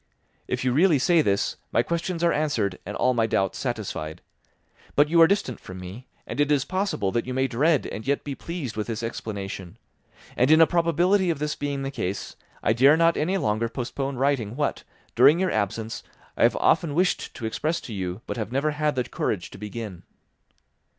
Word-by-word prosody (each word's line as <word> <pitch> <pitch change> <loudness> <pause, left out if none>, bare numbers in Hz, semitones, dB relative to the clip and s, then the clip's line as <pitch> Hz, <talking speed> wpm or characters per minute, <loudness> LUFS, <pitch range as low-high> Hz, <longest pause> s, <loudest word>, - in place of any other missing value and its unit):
If - - -2
you 125 - +2
really 160 +2 +4
say 165 +5 +4
this, 100 -8 0
my - - +3
questions 170 0 -2
are 170 - +4
answered 115 -11 0
and 105 - -4
all 130 - +3
my 115 -2 +2
doubts 95 -3 0
satisfied. 105 - -4 0.7
But 145 +1 +4
you 165 +1 +5
are 165 - +9
distant 180 - -1
from 95 0 -9
me, 95 +8 -9 0.2
and - - -6
it 145 0 +2
is 140 -2 +2
possible 185 - -1
that 120 +3 -1
you 130 - -3
may 130 0 +2
dread 145 +4 +2
and 110 - -6
yet 140 0 +1
be 145 - -4
pleased 155 -5 -6
with 105 -1 -3
this 115 -1 -4
explanation; 100 -5 -5 0.6
and 125 +3 +3
in 155 +1 +7
a 165 - +9
probability 175 +3 +2
of 165 - 0
this 150 +1 -2
being 140 -1 -3
the 135 - -3
case, 100 -7 -4 0.3
I - - +3
dare 135 +6 +6
not 165 0 +4
any 180 +6 0
longer 115 - 0
postpone 130 +3 -4
writing 125 -4 0
what, 145 +1 -1 0.3
during 140 +7 +6
your 190 0 +1
absence, 110 +2 -2 0.3
I - - -5
have - - +5
often 150 -4 +2
wished 180 +2 0
to 120 - -6
express 155 +9 -1
to 115 - -8
you 95 +1 -4
but - - -5
have 110 -1 -4
never 140 +4 +1
had 150 0 0
the 125 - +1
courage 100 -5 -3
to - - -11
begin. 105 -3 -6
130 Hz, 205 wpm, -25 LUFS, 110-155 Hz, 0.7 s, are